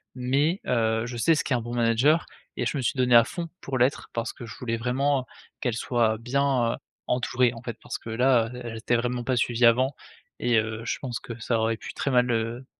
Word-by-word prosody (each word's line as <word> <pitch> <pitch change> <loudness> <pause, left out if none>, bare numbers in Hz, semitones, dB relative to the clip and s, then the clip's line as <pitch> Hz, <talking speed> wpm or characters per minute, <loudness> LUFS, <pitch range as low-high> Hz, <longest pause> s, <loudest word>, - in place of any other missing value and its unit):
mais 140 +8 +1
heu, 110 -2 +1
je 120 0 -6
sais 165 +8 +4
ce 150 - 0
qu'est 135 - -1
un 120 - +1
bon 120 +1 -6
manager 120 +7 +3 0.3
et - - -1
je - - -1
me - - -1
suis 125 - -1
donné 125 -2 +4
à 115 - +9
fond 170 +8 -5
pour 135 -1 -3
l'être, 125 +3 +1
parce 115 +1 -3
que 120 - -9
je 110 - -10
voulais 115 -2 -2
vraiment 130 +3 0 0.4
qu'elles 125 -3 0
soient 115 -3 +1
bien, 125 0 +1
heu, - - -6 0.3
entourées 125 0 +1
en 115 - -10
fait. 120 -3 -5
Parce - - -5
que 115 - -10
là, 120 0 +3
heu, 125 - -7
elles 115 -1 -6
étaient 120 +2 0
vraiment 120 +1 -1
pas 130 - +1
suivies 120 0 +2
avant 130 +4 +4 0.5
et 120 -1 +2
heu, 110 +1 -3
je - - -1
pense 125 -4 -4
que 115 -1 -8
ça 115 0 0
aurait 110 0 0
pu - - -8
très 140 - -2
mal, 125 0 +3
heu, 115 +3 -2
120 Hz, 240 wpm, -26 LUFS, 115-130 Hz, 0.5 s, à